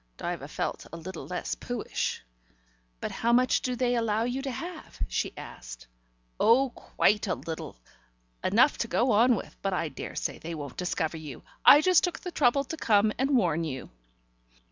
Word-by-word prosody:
Diva -, -, -4 dB
felt -, -, -4 dB
a 165 Hz, -, -7 dB
little 165 Hz, -4 st, -7 dB
less 180 Hz, +2 st, -3 dB
poohish. 245 Hz, -, -3 dB, 0.8 s
"But -, -, -3 dB
how 235 Hz, -, 0 dB
much 250 Hz, +1 st, +4 dB
do 250 Hz, -1 st, -2 dB
they 245 Hz, 0 st, +1 dB
allow 225 Hz, -2 st, +1 dB
you 245 Hz, +3 st, -2 dB
to 270 Hz, -, -3 dB
have?" 330 Hz, +6 st, -7 dB
she -, -, -1 dB
asked. -, -, -9 dB, 0.5 s
"Oh, 250 Hz, +4 st, +4 dB
quite 210 Hz, -3 st, +1 dB
a 180 Hz, -, 0 dB
little: 160 Hz, -, -7 dB, 0.6 s
enough -, -, +4 dB
to -, -, 0 dB
go 235 Hz, +8 st, +2 dB
on 235 Hz, +4 st, +5 dB
with. -, -, -7 dB
But 195 Hz, -1 st, -1 dB
I 165 Hz, -3 st, -1 dB
daresay 135 Hz, -, -4 dB
they 165 Hz, +1 st, -6 dB
won't 145 Hz, -4 st, -7 dB
discover 165 Hz, -3 st, -1 dB
you. 150 Hz, -5 st, -9 dB, 0.2 s
I 290 Hz, -, +9 dB
just 365 Hz, +1 st, +5 dB
took 355 Hz, -4 st, -1 dB
the 360 Hz, -, -5 dB
trouble 275 Hz, -3 st, +3 dB
to 320 Hz, +4 st, -6 dB
come 215 Hz, -5 st, +3 dB
and 270 Hz, 0 st, +3 dB
warn 170 Hz, -6 st, +1 dB
you." 135 Hz, -5 st, -5 dB
220 Hz, 175 wpm, -28 LUFS, 165-255 Hz, 0.8 s, I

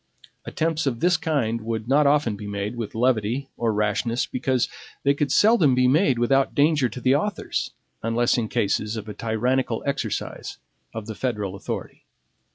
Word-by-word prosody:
Attempts 160 Hz, -2 st, -1 dB
of 120 Hz, -4 st, -1 dB
this 180 Hz, +1 st, +3 dB
kind 140 Hz, -9 st, -1 dB
would 110 Hz, 0 st, -4 dB
not 140 Hz, +3 st, +4 dB
often 140 Hz, -7 st, +2 dB
be 105 Hz, 0 st, -8 dB
made 100 Hz, +2 st, -3 dB
with 115 Hz, -3 st, -5 dB
levity 125 Hz, +2 st, 0 dB
or 115 Hz, -1 st, 0 dB
rashness, 105 Hz, +3 st, 0 dB
because 130 Hz, -1 st, 0 dB, 0.4 s
they 140 Hz, -, +4 dB
could 140 Hz, -1 st, -1 dB
seldom 190 Hz, -, +5 dB
be 125 Hz, 0 st, +4 dB
made 135 Hz, -1 st, +3 dB
without 135 Hz, +3 st, +2 dB
danger 145 Hz, -3 st, +3 dB
to 125 Hz, -, -7 dB
the 130 Hz, +1 st, +3 dB
authors, 200 Hz, +9 st, -1 dB, 0.3 s
unless 120 Hz, +2 st, +1 dB
in 115 Hz, -3 st, 0 dB
cases 105 Hz, +2 st, -1 dB
of 110 Hz, -1 st, -6 dB
a 105 Hz, -, -5 dB
tyrannical 115 Hz, +3 st, -1 dB
exercise 140 Hz, -7 st, -3 dB, 0.3 s
of 110 Hz, -2 st, -6 dB
the 110 Hz, -, -5 dB
federal 105 Hz, -5 st, -3 dB
authority. 100 Hz, -, -6 dB
120 Hz, 165 wpm, -24 LUFS, 110-140 Hz, 0.4 s, seldom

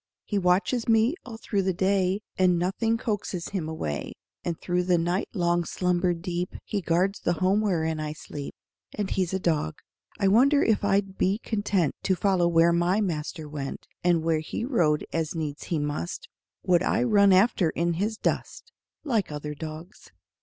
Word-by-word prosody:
He 205 Hz, -, 0 dB
watches 190 Hz, +6 st, +1 dB
me 225 Hz, +4 st, +4 dB
all 230 Hz, -3 st, -8 dB
through 205 Hz, -3 st, -1 dB
the 190 Hz, -1 st, 0 dB
day, 190 Hz, +1 st, +1 dB
And 180 Hz, -2 st, +3 dB
nothing 195 Hz, +6 st, 0 dB
coaxes 205 Hz, -6 st, -3 dB
him 175 Hz, -6 st, -3 dB
away; 75 Hz, -, -4 dB, 0.3 s
And 170 Hz, -2 st, -3 dB
through 180 Hz, 0 st, 0 dB
the 180 Hz, -1 st, +3 dB
night 175 Hz, +4 st, -1 dB
long 175 Hz, -2 st, +2 dB
slumber 180 Hz, +1 st, 0 dB
deep 175 Hz, +1 st, -4 dB
He 205 Hz, -, -2 dB
guards 185 Hz, +4 st, +1 dB
the 175 Hz, -, 0 dB
home 190 Hz, +4 st, +2 dB
wherein 160 Hz, -6 st, 0 dB
I 150 Hz, 0 st, -3 dB
sleep 145 Hz, -2 st, -8 dB, 0.4 s
And 205 Hz, -2 st, -2 dB
he's 185 Hz, -3 st, 0 dB
a 190 Hz, -, 0 dB
dog. 155 Hz, -, 0 dB, 0.4 s
I 195 Hz, -, +3 dB
wonder 270 Hz, +8 st, +5 dB
if 220 Hz, -2 st, +2 dB
I'd 195 Hz, -1 st, 0 dB
be 195 Hz, +2 st, +2 dB
content 205 Hz, -, 0 dB
To 190 Hz, -, +1 dB
follow 185 Hz, -2 st, +2 dB
where 170 Hz, 0 st, +4 dB
my 175 Hz, +4 st, +2 dB
master 160 Hz, -4 st, -3 dB
went, 145 Hz, -2 st, -6 dB, 0.2 s
And 175 Hz, -2 st, +3 dB
where 160 Hz, -1 st, +2 dB
he 155 Hz, +8 st, -4 dB
rode 165 Hz, -, +1 dB
as 165 Hz, 0 st, -1 dB
needs 150 Hz, -3 st, -4 dB
he 165 Hz, -, -1 dB
must 145 Hz, -, -3 dB, 0.4 s
Would 175 Hz, -2 st, +3 dB
I 225 Hz, +5 st, +1 dB
run 205 Hz, -4 st, +5 dB
after 185 Hz, -2 st, +4 dB
in 170 Hz, +2 st, 0 dB
his 210 Hz, +6 st, -1 dB
dust -, -, -3 dB, 0.3 s
Like 225 Hz, -, 0 dB
other 150 Hz, 0 st, -5 dB
dogs. 155 Hz, +5 st, -9 dB
180 Hz, 175 wpm, -26 LUFS, 165-200 Hz, 0.4 s, wonder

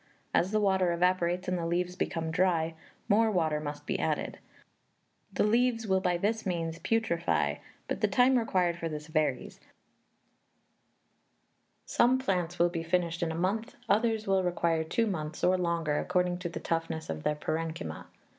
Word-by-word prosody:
As 175 Hz, -, +3 dB
the 215 Hz, +1 st, +1 dB
water 190 Hz, -3 st, +2 dB
evaporates 180 Hz, 0 st, +1 dB
and 180 Hz, -1 st, 0 dB
the 165 Hz, -, -2 dB
leaves 180 Hz, +1 st, -1 dB
become 165 Hz, -3 st, -2 dB
dry, 165 Hz, -2 st, +1 dB, 0.3 s
more 220 Hz, +2 st, +4 dB
water 160 Hz, -6 st, +1 dB
must 150 Hz, -1 st, -6 dB
be -, -, -2 dB
added; -, -, -2 dB, 0.9 s
the -, -, +1 dB
leaves 230 Hz, +1 st, +2 dB
will 190 Hz, -2 st, +2 dB
by 180 Hz, -2 st, +1 dB
this 220 Hz, +5 st, 0 dB
means 165 Hz, -3 st, -2 dB
putrefy, 225 Hz, -7 st, 0 dB, 0.3 s
but -, -, -3 dB
the -, -, +4 dB
time 255 Hz, +1 st, +4 dB
required 180 Hz, -7 st, +1 dB
for 165 Hz, -, -2 dB
this 150 Hz, -1 st, -6 dB
varies; 155 Hz, -1 st, -1 dB, 2.3 s
some 250 Hz, +2 st, +3 dB
plants 180 Hz, -9 st, -1 dB
will 175 Hz, 0 st, +4 dB
be 170 Hz, -1 st, -3 dB
finished 170 Hz, 0 st, 0 dB
in 165 Hz, -1 st, 0 dB
a -, -, -4 dB
month, 195 Hz, +7 st, -1 dB
others 220 Hz, 0 st, +2 dB
will 195 Hz, -1 st, +2 dB
require 170 Hz, -2 st, +1 dB
two 200 Hz, +9 st, 0 dB
months 160 Hz, -7 st, -4 dB
or 185 Hz, +1 st, +4 dB
longer, 170 Hz, -4 st, 0 dB
according 180 Hz, -1 st, 0 dB
to 180 Hz, -1 st, -3 dB
the -, -, -6 dB
toughness 165 Hz, -1 st, -2 dB
of 80 Hz, -1 st, -4 dB
their 150 Hz, -, 0 dB
parenchyma. 155 Hz, -, -4 dB
175 Hz, 165 wpm, -30 LUFS, 165-195 Hz, 2.3 s, more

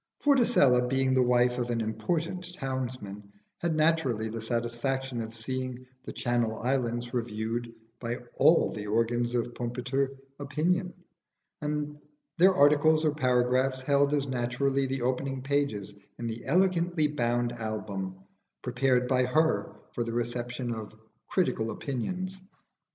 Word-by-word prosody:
Vorticella 220 Hz, -, +5 dB
being 130 Hz, 0 st, +2 dB
the 130 Hz, -, +4 dB
wife 125 Hz, 0 st, +3 dB
of 120 Hz, 0 st, -2 dB
an 120 Hz, -1 st, 0 dB
important 170 Hz, +10 st, -2 dB
townsman 125 Hz, -, -5 dB, 0.3 s
had 170 Hz, -2 st, 0 dB
naturally 155 Hz, -9 st, +2 dB
the 115 Hz, +1 st, -5 dB
satisfaction 120 Hz, +2 st, -2 dB
of 110 Hz, 0 st, -7 dB
seeing 130 Hz, +2 st, -4 dB, 0.2 s
'The -, -, -6 dB
Channel 120 Hz, -3 st, 0 dB
Islands' 120 Hz, -1 st, -1 dB
reviewed 115 Hz, 0 st, -2 dB, 0.3 s
by 120 Hz, -1 st, -2 dB, 0.2 s
all -, -, +5 dB
the 105 Hz, 0 st, -6 dB
organs 120 Hz, +2 st, +1 dB
of 120 Hz, 0 st, -1 dB
Pumpiter 125 Hz, +3 st, -1 dB, 0.3 s
opinion, 170 Hz, +6 st, 0 dB, 0.7 s
and 150 Hz, 0 st, -3 dB, 0.4 s
their 185 Hz, +2 st, +6 dB
articles 150 Hz, +2 st, +5 dB
or 150 Hz, -, +3 dB
paragraphs 130 Hz, -1 st, +2 dB
held 140 Hz, +1 st, +3 dB
as 145 Hz, -2 st, +1 dB
naturally 135 Hz, +2 st, 0 dB
the 130 Hz, -1 st, -2 dB
opening 130 Hz, +1 st, -1 dB
pages 140 Hz, -9 st, -1 dB, 0.2 s
in 120 Hz, -, -5 dB
the 115 Hz, 0 st, -5 dB
elegantly 175 Hz, 0 st, +2 dB
bound 120 Hz, -4 st, 0 dB
album 110 Hz, -5 st, -4 dB, 0.5 s
prepared 125 Hz, 0 st, +2 dB
by 130 Hz, -1 st, +3 dB
her 160 Hz, +4 st, +2 dB, 0.2 s
for 120 Hz, -, -1 dB
the 115 Hz, 0 st, -4 dB
reception 120 Hz, +1 st, -2 dB
of 110 Hz, -1 st, -7 dB, 0.3 s
"critical 115 Hz, -11 st, 0 dB
opinions." 185 Hz, +11 st, -4 dB
125 Hz, 130 wpm, -29 LUFS, 120-145 Hz, 0.7 s, their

